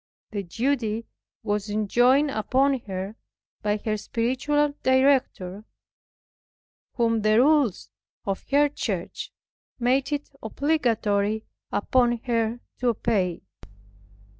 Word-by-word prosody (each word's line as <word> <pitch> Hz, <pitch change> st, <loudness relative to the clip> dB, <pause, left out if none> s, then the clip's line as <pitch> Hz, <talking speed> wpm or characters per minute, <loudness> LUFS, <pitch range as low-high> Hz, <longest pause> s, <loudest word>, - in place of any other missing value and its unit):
The 205 Hz, -2 st, -2 dB
duty 230 Hz, +3 st, -1 dB, 0.4 s
was 210 Hz, -1 st, -1 dB
enjoined 245 Hz, +7 st, +3 dB
upon 265 Hz, +5 st, +2 dB
her 195 Hz, +3 st, -5 dB, 0.4 s
by 210 Hz, 0 st, +1 dB
her 215 Hz, -1 st, 0 dB
spiritual 260 Hz, +7 st, 0 dB
director, 260 Hz, -8 st, +2 dB, 1.3 s
whom 230 Hz, -2 st, +2 dB
the 215 Hz, +1 st, +3 dB
rules 280 Hz, -, +3 dB, 0.3 s
of 195 Hz, -1 st, -2 dB
her 290 Hz, +1 st, +5 dB
church 290 Hz, -, -4 dB, 0.5 s
made 255 Hz, +3 st, +1 dB
it 290 Hz, 0 st, -3 dB
obligatory 220 Hz, -6 st, 0 dB, 0.3 s
upon 240 Hz, +2 st, +2 dB
her 230 Hz, -1 st, 0 dB, 0.2 s
to 250 Hz, -, 0 dB
obey. 205 Hz, -6 st, 0 dB
235 Hz, 95 wpm, -25 LUFS, 210-265 Hz, 1.3 s, her